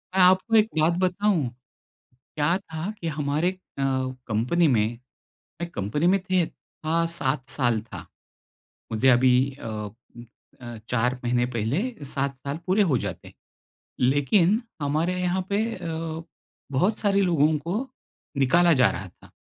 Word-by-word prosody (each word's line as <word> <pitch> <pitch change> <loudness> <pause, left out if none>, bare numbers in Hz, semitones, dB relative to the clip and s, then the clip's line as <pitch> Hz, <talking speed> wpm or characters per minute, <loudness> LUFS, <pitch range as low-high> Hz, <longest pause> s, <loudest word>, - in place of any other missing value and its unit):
मैं 190 - +4
आपको 185 +5 +5
एक 215 -1 +6
बात 160 +2 +4
बताऊँ? 185 -5 +1 0.9
क्या 155 +4 +2
था 160 +1 -5
कि 170 - -3
हमारे 150 +2 0
अ, 190 - -14 0.7
कंपनी 125 +11 +2
में, 115 -3 +1 0.6
मैं 170 - -3
कंपनी 110 - -1
में 195 +2 +4
थे 185 -2 +2
था, 165 +2 -3
7 140 -6 -2
साल 120 -5 +1
था। 110 - -10 0.9
मुझे 125 +5 +3
अभी 125 0 +5 0.3
अ, - - -6
उम, 110 +2 -8 0.4
अ, 120 -1 -7
4 125 +1 0
महीने 120 0 +1
पहले 115 - 0 0.2
7 140 0 -2
साल 140 +2 -2
पूरे 190 +3 +3
हो 130 - +3
जाते। - - -7 0.7
लेकिन 145 - +3 0.2
हमारे 160 +6 0
यहाँ 180 +1 0
पे 205 +2 +2
अ, 165 0 -4 0.5
बहुत 185 +11 +1
सारे 200 -1 +2
लोगों 160 -4 +3
को 195 - -3 0.5
निकाला 170 +6 +4
जा 130 -3 +4
रहा 95 +2 -6
था। 85 - -20
155 Hz, 140 wpm, -25 LUFS, 125-180 Hz, 0.9 s, एक